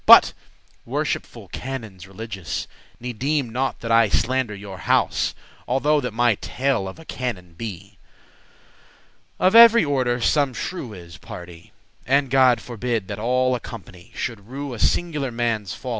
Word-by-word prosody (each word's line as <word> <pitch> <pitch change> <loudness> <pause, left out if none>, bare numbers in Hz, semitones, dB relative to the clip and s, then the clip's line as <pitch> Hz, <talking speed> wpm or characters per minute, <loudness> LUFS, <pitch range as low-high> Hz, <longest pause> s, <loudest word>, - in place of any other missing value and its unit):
But, - - +9 0.5
worshipful - - -3
canons 110 -8 -7
religious, 100 -4 -5 0.3
Ne 125 +1 -5
deeme 135 +1 -1
not 130 +3 -2
that 115 - -3
I 115 -2 +5
slander 120 +1 0
your 100 -2 -9
house, - - +1 0.3
Although 145 +4 +2
that 125 - -3
my 120 +1 +3
tale 130 -7 -1
of 95 - -8
a 165 - -13
canon 100 - -5
be. 100 0 -8 1.4
Of 185 +2 +3
every 230 -3 +9
order 130 -4 +1
some 135 +1 +2
shrew 130 -5 -5
is, 85 -3 -11
pardie; 85 -1 -10 0.4
And 135 0 +2
God 130 -3 +5
forbid 115 -4 -3
that 100 0 -4
all 125 +3 +2
a 125 - -1
company 100 -6 -11
Should 110 -5 -4
rue 140 +1 -5
a 115 - -7
singular* 150 -6 +1
manne's 115 -5 -2
folly. 130 - -7
120 Hz, 150 wpm, -23 LUFS, 100-135 Hz, 1.4 s, But